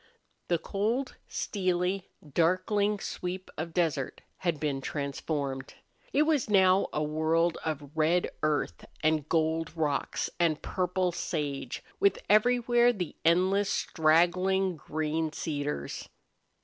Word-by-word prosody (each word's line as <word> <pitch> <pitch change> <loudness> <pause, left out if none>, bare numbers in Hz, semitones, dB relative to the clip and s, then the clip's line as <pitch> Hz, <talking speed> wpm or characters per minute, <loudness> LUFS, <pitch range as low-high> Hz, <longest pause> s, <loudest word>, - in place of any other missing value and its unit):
The 170 - +2
cold, 220 +10 -2
steely, 185 -1 -1 0.2
darkling 185 +7 +2
sweep 185 0 -5
of 165 +2 -4
desert 160 -6 -1 0.2
had 170 -5 -1
been 140 -3 -1
transformed. 140 -1 -3 0.4
It 290 - +4
was 305 -7 +1
now 190 -1 +5
a 150 - -1
world 160 +2 +1
of 150 -3 -4
red 160 +3 +2
earth 155 -1 0 0.2
and 155 -1 +2
gold 160 0 0
rocks 150 -3 0
and 165 -3 +2
purple 180 0 0
sage, 145 -6 -3 0.2
with 200 - +4
everywhere 240 +2 +4
the 180 -9 -4
endless 185 +4 +3
straggling 180 +4 +2
green 155 +1 -2
cedars. 145 -2 -3
170 Hz, 110 wpm, -29 LUFS, 155-190 Hz, 0.4 s, now